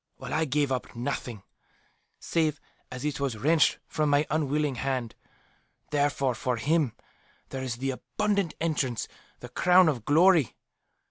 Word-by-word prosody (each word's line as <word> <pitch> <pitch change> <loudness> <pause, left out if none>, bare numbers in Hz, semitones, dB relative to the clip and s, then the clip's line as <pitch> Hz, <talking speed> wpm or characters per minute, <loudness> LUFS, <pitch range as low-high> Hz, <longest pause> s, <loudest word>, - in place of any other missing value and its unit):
"While - - -7
I 160 +1 +2
gave 145 -1 0
up 130 -1 -3
nothing, 120 -4 -4 0.8
save 155 -3 0 0.3
as 125 +2 -6
it 150 -1 -2
was 135 -5 -2
wrenched 155 +7 +3
from 155 -1 -1
my 145 +1 +3
unwilling 150 -1 0
hand. 125 -2 -2 0.8
Therefore 145 -3 +1
for 125 +1 -2
him 145 0 +1 0.6
there 135 - -5
is 130 -3 -3
the 135 +3 -2
'abundant 200 +5 -1
entrance,' 145 -8 -1 0.3
the - - -8
'crown 180 0 +5
of 130 -8 0
glory. 160 - +4
145 Hz, 140 wpm, -27 LUFS, 130-155 Hz, 0.8 s, crown